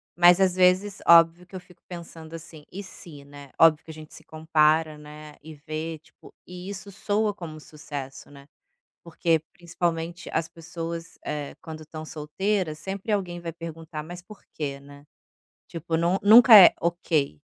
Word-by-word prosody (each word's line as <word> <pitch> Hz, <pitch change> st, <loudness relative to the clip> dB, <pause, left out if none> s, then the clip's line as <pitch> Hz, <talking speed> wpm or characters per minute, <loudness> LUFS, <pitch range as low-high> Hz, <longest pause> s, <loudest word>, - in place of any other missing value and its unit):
mas 175 Hz, +1 st, +6 dB
às 185 Hz, -1 st, +2 dB
vezes 185 Hz, +2 st, +2 dB
óbvio 170 Hz, +1 st, +6 dB
que 190 Hz, -, -13 dB
eu -, -, -5 dB
fico 180 Hz, -1 st, -21 dB
pensando 165 Hz, -2 st, -10 dB
assim, 160 Hz, -2 st, -11 dB
"E 200 Hz, +2 st, -7 dB
se?" 160 Hz, -6 st, -12 dB
né, 145 Hz, -1 st, -13 dB
óbvio 160 Hz, -2 st, +5 dB
que 160 Hz, -, -11 dB
a -, -, -10 dB
gente 155 Hz, 0 st, -13 dB
se -, -, -13 dB
compara, 155 Hz, 0 st, +1 dB
né, 150 Hz, 0 st, -12 dB
e 155 Hz, 0 st, -11 dB
vê 155 Hz, +2 st, -6 dB
tipo, 160 Hz, -, -20 dB
e 180 Hz, +2 st, -9 dB
isso 200 Hz, 0 st, -8 dB
soa 210 Hz, +1 st, -1 dB
como 160 Hz, -5 st, -9 dB
sucesso, 145 Hz, -4 st, -9 dB
né, 140 Hz, 0 st, -16 dB, 0.6 s
porque 165 Hz, -1 st, 0 dB
principalmente 170 Hz, -1 st, -4 dB
as 160 Hz, -, -1 dB
pessoas, 165 Hz, 0 st, -8 dB
eh, 150 Hz, -1 st, -5 dB
quando 155 Hz, -1 st, -9 dB
estão 155 Hz, 0 st, -9 dB
solteiras 160 Hz, +2 st, -3 dB
sempre 195 Hz, +5 st, -5 dB
alguém 180 Hz, -4 st, -2 dB
vai 170 Hz, -1 st, -6 dB
perguntar: 165 Hz, -2 st, -8 dB
"Mas 175 Hz, +2 st, -9 dB
por 210 Hz, +3 st, -15 dB
que?", 140 Hz, -3 st, -5 dB
né, 140 Hz, 0 st, -15 dB, 0.6 s
tipo 165 Hz, 0 st, -4 dB
não 170 Hz, +2 st, +1 dB
nu 205 Hz, +2 st, +6 dB
nunca 240 Hz, -2 st, +9 dB
é 185 Hz, -, +9 dB
ok. 160 Hz, -, -1 dB
165 Hz, 170 wpm, -25 LUFS, 155-180 Hz, 0.6 s, nunca